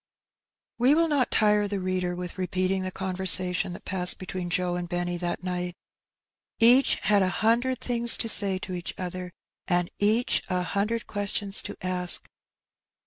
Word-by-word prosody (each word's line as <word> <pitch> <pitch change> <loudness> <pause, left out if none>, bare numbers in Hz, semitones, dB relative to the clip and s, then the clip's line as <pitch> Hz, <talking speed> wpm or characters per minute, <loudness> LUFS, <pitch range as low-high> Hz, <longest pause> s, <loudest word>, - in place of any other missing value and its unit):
We 260 +5 +4
will 330 +1 +3
not 285 -5 +1
tire 210 -1 +2
the 200 -1 -3
reader 185 -1 -2
with 180 +1 -7
repeating 185 +1 -1
the 185 0 -4
conver 190 -1 -5
sation 180 0 +2
that - - -11
passed 180 -2 +3
between 185 -1 -6
Joe 175 0 -1
and 175 -1 -5
Benny 175 0 -2
that 175 0 -4
night. 180 -1 -4 0.8
Each 245 +4 +5
had 205 0 +3
a 185 - +2
hundred 235 +6 0
things 235 -1 +4
to 230 - -3
say 200 -3 +4
to 185 0 -7
each 175 -1 -5
other, 180 0 -6 0.4
and 175 -2 0
each 220 +4 +2
a 180 -1 -1
hundred 210 +5 -2
questions 205 -1 +1
to - - -7
ask. 180 -2 -2
185 Hz, 165 wpm, -26 LUFS, 180-210 Hz, 0.8 s, Each